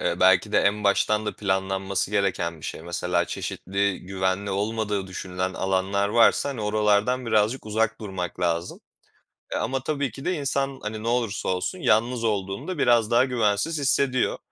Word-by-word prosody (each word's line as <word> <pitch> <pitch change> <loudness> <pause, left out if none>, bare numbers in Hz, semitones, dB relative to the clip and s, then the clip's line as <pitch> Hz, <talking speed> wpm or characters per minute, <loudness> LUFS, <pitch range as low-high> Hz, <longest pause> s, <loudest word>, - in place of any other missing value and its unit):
Eee, - - 0
belki 95 +3 +4
de - - +5
en 105 +1 +1
baştan 105 +2 +2
da 105 - -3
planlanması 95 0 -1
gereken 90 -5 -1
bir - - -12
şey. - - -5
Mesela, 85 0 -1
çeşitli 100 +2 -2
güvenli 95 +1 -2
olmadığı 105 0 -1
düşünülen 90 0 -4
alanlar 95 +1 0
varsa, 115 +5 +4
hani, 130 -6 -4
oralardan 105 +4 +1
birazcık 110 +2 +1
uzak 110 +1 0
durmak 95 -4 -5
lazım. 85 0 -1 0.7
E, - - -2
ama 130 +3 -1
tabii 140 -3 -1
ki 135 +6 -10
de 180 - +1
insan, 140 -2 -1
hani, 110 0 -5
ne 115 - -2
olursa 120 -3 -1
olsun 95 - -1
yalnız 115 -4 +2
olduğunda 105 - -2
biraz 120 -4 +3
daha 120 +2 +5
güvensiz 125 +5 0
hissediyor. 135 -2 +1
105 Hz, 160 wpm, -25 LUFS, 95-120 Hz, 0.7 s, de